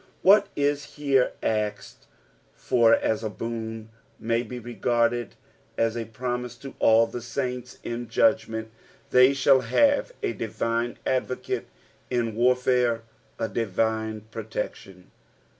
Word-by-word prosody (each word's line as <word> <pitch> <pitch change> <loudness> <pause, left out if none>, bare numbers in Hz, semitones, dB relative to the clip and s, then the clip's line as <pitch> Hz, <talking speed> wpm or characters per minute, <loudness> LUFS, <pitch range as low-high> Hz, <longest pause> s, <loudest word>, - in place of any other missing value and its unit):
What 200 +1 +6
is 145 0 -1
here 140 -3 +2
aakcd 105 -2 -2 0.5
for 115 -2 +4
as 110 0 -1
a 110 - -1
boon, 115 0 -5 0.3
ma; 115 +1 0
be 125 +1 -7
reg^^ed 120 -1 0 0.5
ns 115 0 +1
a 115 -1 -3
promise 125 +2 -4
to 135 +2 -9
all 115 +1 +5
the 120 - -6
saints; 125 0 -4
in 120 0 -4
judgment 110 0 +1 0.4
they 125 +2 +6
shaU 135 0 +5
have 280 - +2
a 405 - 0
divine 115 +2 -2
advocate, 130 -1 -2 0.4
in 120 -3 0
warfare 125 0 +2 0.3
a 115 - -1
divine 110 0 -1
protection. 105 -4 -6
115 Hz, 120 wpm, -26 LUFS, 110-125 Hz, 0.5 s, What